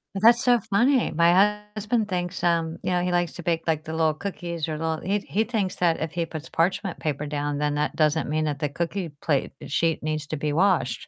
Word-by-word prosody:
That's 230 +4 +5
so 245 -1 +4
funny. 245 +5 +3
My 185 +6 +4
husband 215 +1 0
thinks, 180 -1 -3
um, 165 -1 +1
you - - -1
know 180 -1 +1
he 180 - 0
likes 175 -2 0
to 175 - -8
bake, 165 -1 0
like, 155 -1 0
the 160 - -7
little 160 -1 +2
cookies 170 -3 -4
or 155 - -3
little 160 0 -2
He 200 +3 0
he 210 +2 -1
thinks 215 -5 -2
that 170 -2 +1
if 160 -1 -2
he 170 -1 -1
puts 160 0 -8
parchment 185 +3 0
paper 150 -1 -2
down, 145 0 -2
then 150 0 0
that 150 +1 -1
doesn't 155 0 +2
mean 155 +1 0
that 150 -2 -1
the 150 -1 -1
cookie 170 +4 -3
plate 145 -4 0 0.2
sheet 165 +2 0
needs 155 -1 -2
to 155 - -3
be 150 +1 -1
washed. 150 - +1
170 Hz, 230 wpm, -25 LUFS, 155-190 Hz, 0.2 s, That's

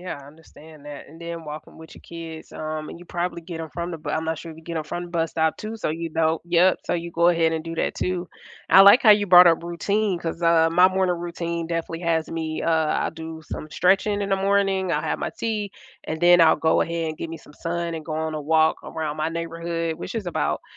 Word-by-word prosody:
yeah, 180 -4 -6
I - - -14
understand 155 0 -16
that, 145 -1 -9
and 165 +3 -15
then 170 -1 -6
walking 150 0 -9
with 160 0 -13
your - - -14
kids, 165 -1 -9
um, 155 0 -5
and - - -9
you 175 - -13
probably 175 0 -4
get 165 -1 -7
'em 160 - -6
from 170 +3 -5
the 165 - -6
b 150 - -9
I'm 160 +2 -1
not 160 -1 -2
sure 165 - -8
if 160 - -11
you 160 - -14
get 170 -1 -5
'em 155 - -4
from 175 +3 -5
the 175 - -11
bus 165 -1 -1
stop 160 -1 +1
too, 215 +1 -6
so, 215 - -2
you 165 +1 -4
know 160 0 +1
Yep, 175 +2 +4
so, - - 0
you 170 0 -4
go 170 +1 +3
ahead 165 -2 +2
and 160 -1 -2
do 165 0 -6
that - - -1
too. 180 -1 -2 0.4
I 190 - +9
like 200 +6 +8
how 220 - +7
you 205 -1 +5
brought 180 -1 +9
up 170 -1 +4
routine 190 +3 -1
'cause, 165 0 -5
uh, 165 -1 +4
my 180 +2 +6
morning 185 -1 0
routine 170 -1 -4
definitely 165 0 -4
has 165 -2 0
me, 160 -1 -3
uh 165 - +1 0.4
I - - -3
do 160 0 -8
some 155 - -7
stretching 205 +2 +2
in 200 - -3
the 195 - +3
morning, 195 -1 +1
I'll - - 0
have - - -2
my - - -3
tea, 215 -3 -2 0.3
and 160 - -4
then 175 0 +7
I'll 160 -1 +6
go 160 - +2
ahead 165 -1 -1
and 155 0 -6
get 165 - -5
me 165 - -6
some 150 - -17
sun, 170 +2 -3
and 160 -1 -6
go 155 - -4
on 160 0 -2
a 155 - -3
walk 160 +1 +2
around 155 -1 -5
my 155 +1 0
neighborhood, 165 0 -3
which - - -7
is 220 -5 -4
about, 175 - -1
165 Hz, 265 wpm, -23 LUFS, 160-175 Hz, 0.4 s, I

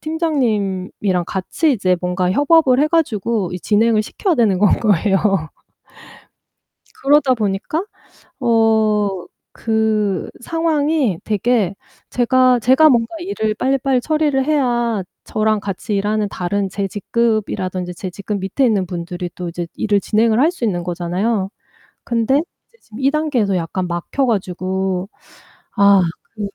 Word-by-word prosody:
팀장님이랑 210 - -1
같이 275 - 0
이제 185 -5 +1
뭔가 180 0 -1
협업을 285 - +4
해 300 - +4
가지고 230 - 0
이 180 - -4
진행을 215 0 +2
시켜야 360 - -1
되는 210 -7 +2
건 205 0 +4
거예요. 200 -2 +2 1.8
그러다 275 -1 +4
보니까 215 - -2 0.6
어 215 -5 +2 0.3
그 215 -4 0
상황이 305 - 0
되게 210 -2 0 0.3
제가 255 +1 +3
제가 260 +7 +5
뭔가 235 +2 +1
일을 220 - -2
빨리빨리 265 +2 +1
처리를 295 -2 +1
해야 240 -8 0 0.2
저랑 215 -1 0
같이 200 +1 -4
일하는 210 +1 0
다른 195 +1 -2
제 195 +1 -3
직급이라든지 195 -4 -2
제 185 +1 -6
직급 200 +2 -5
밑에 195 +8 0
있는 205 -5 +1
분들이 175 0 -5
또 180 -1 -5
이제 170 0 -5
일을 205 -2 +1
진행을 220 +3 +2
할 310 +5 +4
수 355 -9 -6
있는 180 -6 -1
거잖아요. 185 +4 -2 0.6
근데 235 +2 +1 0.3
이제 465 - -28
지금 220 +2 -13
이 275 - +3
단계에서 265 -11 0
약간 180 +2 -3
막혀 175 +10 -2
가지고 190 -2 -2 0.7
아 200 -1 +6 0.3
그 220 - -12
215 Hz, 280 characters per minute, -18 LUFS, 190-255 Hz, 1.8 s, 아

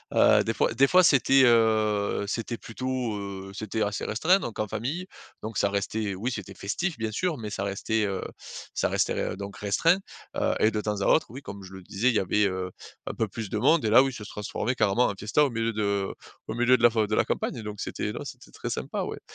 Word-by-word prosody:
heu, - - +6
des 115 - 0
fois 110 - +1
des 135 +4 +4
fois, 185 +3 +6
c'était, 135 -2 +5
heu, 110 -3 +3
c'était 115 +2 -3
plutôt, 125 -2 -3
heu, 95 -1 -6
c'était 110 +1 -3
assez 105 0 -2
restreint 170 - +3
donc 115 - -6
en 105 - 0
famille. 155 - -3 0.3
Donc 110 0 -5
ça 100 - +2
restait 100 0 -2
oui, 120 +7 -2
c'était 100 -3 -6
festif, 150 - -3
bien 110 -1 -2
sûr, 170 - -1
mais 110 -2 -5
ça 100 - -3
restait, 105 +2 0
heu, 95 -1 -2 0.5
ça - - +1
restait - - 0
r - - -8
donc 100 0 -7
restreint, 165 - +2 0.4
heu - - +1
et 110 - +5
de 105 - -1
temps 105 -1 -2
à - - 0
autre, 155 - +4
oui, 135 - -8
comme 100 -6 -9
je 95 0 -11
le 95 - -9
disais, 110 +7 0
il 115 - 0
y - - +4
avait, 100 +3 +2
heu, 95 -1 -2 0.3
un - - -4
peu 110 - -1
plus 105 0 -6
de 105 - -2
monde 140 +5 +4
et 110 - +1
là 120 +4 +7
oui, 135 -1 -2
ça 110 - -7
se - - -9
transformait 105 +4 -3
carrément 115 +2 +3
en 100 - -3
fiesta 110 +8 +2
au 140 - +2
milieu 115 -1 -1
de 100 -2 -1 0.3
au - - -3
milieu 125 +1 +4
de 120 - -5
la 120 - +9
f 115 - -12
de 110 - -1
la - - +3
campagne. 115 - -2
Donc 105 -1 -6
c'était - - -3
non, - - -5
c'était - - -10
très - - -6
sympa, - - -3
ouais. - - -5
110 Hz, 250 wpm, -27 LUFS, 100-120 Hz, 0.5 s, la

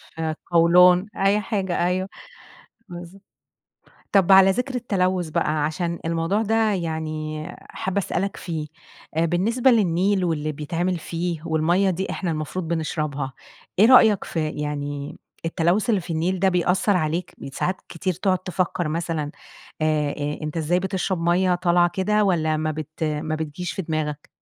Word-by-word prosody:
في 165 - -5
القولون، 175 +4 +4
أي 195 +2 +3
حاجة 190 -4 -1
أيوه، 185 +2 -1 0.8
بالض 175 +2 -10 0.9
طَب 195 -1 +4
على 190 0 +8
ذِكر 250 +5 -2
التلوث 185 -7 0
بقى، 150 -1 0
عشان 170 +2 -2
الموضوع 165 +6 0
ده 220 0 +2
يعني 155 -3 -3 0.2
حابّة 190 +1 -4
اسألك 195 +1 -2
فيه، 160 -4 -4 0.5
آآ 165 +1 +2
بالنسبة 230 +10 +2
للنيل 190 -2 +2
واللي 155 -2 -1
بيتعمل 170 +5 -2
فيه، 170 -1 -3
والمَيّة 170 +4 +2
دي 185 +2 -2
إحنا 175 -4 -2
المفروض 160 +3 -4
بنشربها. 155 -4 -2 0.5
إيه 215 - +8
رأيك 220 -5 +6
ف - - -11
يعني 145 -2 -3 0.3
التلوث 175 +6 +1
اللي 205 -5 +2
في 165 - -5
النيل 175 +3 0
ده 190 0 +3
بيأثّر 180 +2 +2
عليك؟ 165 +2 -2
بيت 135 - -9
ساعات 185 +1 -1
كتير 180 +2 -2
تقعُد 185 +2 +1
تفكّر 180 -2 -2
مثلًا 160 -2 -2 0.5
آآ 155 -2 +1
آآ 145 +1 -4
أنت 155 +2 -4
إزاي 170 +3 +1
بتشرب 190 -1 -2
مَيّة 180 +1 +2
طالعة 175 -1 +3
كده، 210 +2 +1
والّا 160 -5 +1
ما 155 0 -1
بت 155 +1 -6
ما 155 +1 -1
بتجيش 160 +3 -4
في 190 - -3
دماغك؟ 155 -2 -3
175 Hz, 150 wpm, -23 LUFS, 155-190 Hz, 0.9 s, على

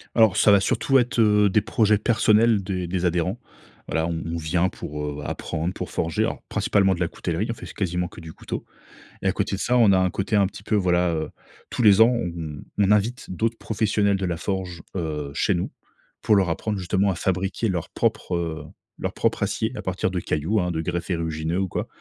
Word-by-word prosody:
Alors, 110 -5 +5
ça 105 - +6
va 100 - +7
surtout 135 +7 +2
être, 120 0 -1
heu, 105 -2 +5
des 105 +2 +3
projets 110 -3 +2
personnels 110 -1 +3
des 90 -2 -3
des 90 0 -1
adhérents. 90 +5 0 0.5
Voilà, 80 +1 0
on 85 -1 -3
on 85 0 -3
vient 85 +3 +1
pour, 75 -3 -6
heu, 75 0 -5
apprendre, 80 +4 -3
pour - - -6
forger, 80 -2 0
alors, - - -2
principalement 95 -2 +2
de 85 - -9
la 90 - +1
coutellerie. - - -3
On - - -1
fait - - -10
s - - -10
quasiment 90 0 -1
que - - -13
du 80 -1 -9
couteau! - - -6 0.6
Et - - -1
à - - +4
côté - - -1
de 95 - -5
ça, 125 +1 +2
on 115 -4 +6
a 95 - +5
un 95 0 +2
côté 95 +4 -2
un 100 - +5
petit 100 +1 -11
peu 110 - 0
voilà, 90 -3 +2
heu, 80 -1 -2 0.4
tous - - -2
les 105 -1 +7
ans, 115 - +8
on 85 -9 -4 0.2
on 100 -1 +3
invite 105 +4 +1
d'autres 115 +5 -1
professionnels 105 -2 +1
de 95 - -2
la 85 -2 -2
forge, 90 -2 -4
heu, 75 -5 -3
chez - - +1
nous 85 - -2 0.5
pour 105 - +4
leur 95 -3 +2
apprendre, 105 +5 -2
justement, 95 +2 +1
à - - -3
fabriquer 95 +5 -1
leur 90 -5 -2
propre, 90 - -1
heu, 80 -3 -3 0.3
leur - - -3
propre - - 0
acier 110 +3 -1
à - - -5
partir 95 0 -1
de 90 - -1
cailloux, 85 +10 0
hein, 90 - -1
de 80 - -2
greffes 85 +2 -3
érugineux 80 0 -1
ou 95 - 0
quoi. - - -3
95 Hz, 225 wpm, -24 LUFS, 85-105 Hz, 0.6 s, ans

